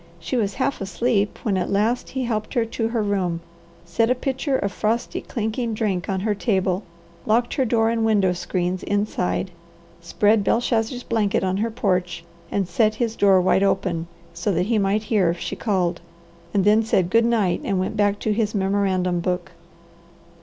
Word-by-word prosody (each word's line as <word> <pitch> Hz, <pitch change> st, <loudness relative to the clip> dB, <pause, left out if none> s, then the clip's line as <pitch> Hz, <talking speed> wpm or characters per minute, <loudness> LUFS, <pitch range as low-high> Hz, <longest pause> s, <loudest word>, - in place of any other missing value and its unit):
She 165 Hz, -, -4 dB
was 205 Hz, -5 st, 0 dB
half 270 Hz, -2 st, -1 dB
asleep 205 Hz, +1 st, 0 dB
when 200 Hz, -4 st, +1 dB
at 180 Hz, -, -1 dB
last 220 Hz, +5 st, 0 dB
he 265 Hz, -1 st, -3 dB
helped 215 Hz, -3 st, -3 dB
her 235 Hz, -2 st, +2 dB
to 225 Hz, 0 st, -2 dB
her 230 Hz, -1 st, -1 dB
room, 185 Hz, -5 st, -1 dB, 0.5 s
set 225 Hz, +7 st, +1 dB
a 250 Hz, -, +3 dB
pitcher 265 Hz, +2 st, -1 dB
of 200 Hz, -4 st, -2 dB
frosty, 225 Hz, +4 st, -1 dB
clinking 225 Hz, 0 st, -3 dB
drink 200 Hz, -5 st, -1 dB
on 190 Hz, -1 st, -1 dB
her 210 Hz, +1 st, +1 dB
table, 190 Hz, -3 st, 0 dB, 0.5 s
locked 235 Hz, +2 st, +2 dB
her 265 Hz, -, +1 dB
door 225 Hz, -1 st, +2 dB
and 230 Hz, -1 st, 0 dB
window 205 Hz, -5 st, +3 dB
screens 180 Hz, +1 st, -2 dB
inside, 200 Hz, -2 st, -1 dB, 0.5 s
spread 205 Hz, +5 st, +2 dB
Belshazzar's 230 Hz, +3 st, 0 dB
blanket 215 Hz, -4 st, 0 dB
on 190 Hz, 0 st, 0 dB
her 225 Hz, +3 st, 0 dB
porch, 185 Hz, -7 st, -1 dB, 0.3 s
and 195 Hz, -3 st, -1 dB
set 215 Hz, +5 st, +2 dB
his 230 Hz, -1 st, -1 dB
door 195 Hz, -3 st, +5 dB
wide 185 Hz, +1 st, +3 dB
open, 185 Hz, -4 st, 0 dB, 0.4 s
that 180 Hz, -4 st, +1 dB
he 220 Hz, 0 st, +1 dB
might 200 Hz, +2 st, +1 dB
hear 205 Hz, -5 st, +2 dB
if 170 Hz, -, -1 dB
she -, -, -4 dB
called, 180 Hz, -6 st, -1 dB, 0.5 s
and 195 Hz, 0 st, +1 dB
then 210 Hz, +2 st, +5 dB
said 190 Hz, -5 st, +1 dB
good 230 Hz, 0 st, +5 dB
night 225 Hz, -6 st, +1 dB
and 195 Hz, -2 st, 0 dB
went 185 Hz, +3 st, -2 dB
back 205 Hz, -1 st, +2 dB
to 215 Hz, -, +1 dB
his 215 Hz, 0 st, -1 dB
memorandum 190 Hz, -2 st, +1 dB
book. 180 Hz, 0 st, -2 dB
205 Hz, 180 wpm, -23 LUFS, 185-225 Hz, 0.5 s, door